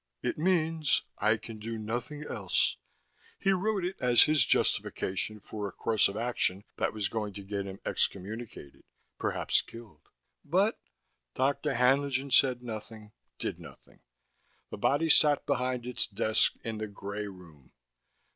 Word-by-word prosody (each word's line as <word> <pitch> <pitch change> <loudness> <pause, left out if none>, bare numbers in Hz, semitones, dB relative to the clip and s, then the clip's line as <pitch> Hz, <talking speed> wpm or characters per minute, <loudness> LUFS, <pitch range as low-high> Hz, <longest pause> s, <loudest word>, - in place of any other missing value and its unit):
"It - - 0
means: 160 -3 +1 0.2
'I 110 +1 +3
can 110 0 -9
do 115 +1 -4
nothing 120 +7 -4
else.' 100 -10 0 0.6
He 195 - +2
wrote 195 0 +1
it 185 - -3
as 120 -1 +6
his 150 -4 +4
justification 105 -1 0
for 105 0 -5
a - - -7
course 110 +3 +2
of 100 - -5
action 110 -4 0
that - - +1
was 105 -2 -1
going 105 -2 -3
to 100 - -7
get 100 0 -4
him 95 0 -8
excommunicated, 100 - -3 0.4
perhaps - - +1
killed." 110 -10 -14 0.3
"But 195 +8 +2 0.3
" - - -50
Dr. 140 +1 +1
Haenlingen 135 +2 +2
said 125 -1 +4
nothing, 110 -2 -8 0.3
did - - -4
nothing. - - -14 0.7
The - - -5
body 155 +4 +2
sat 150 -2 +5
behind 125 -3 -1
its 125 -2 0
desk 110 +2 +2
in 110 -1 -4
the 110 - -3
gray 100 +1 -5
room. 85 -8 -14
115 Hz, 145 wpm, -30 LUFS, 105-140 Hz, 0.7 s, as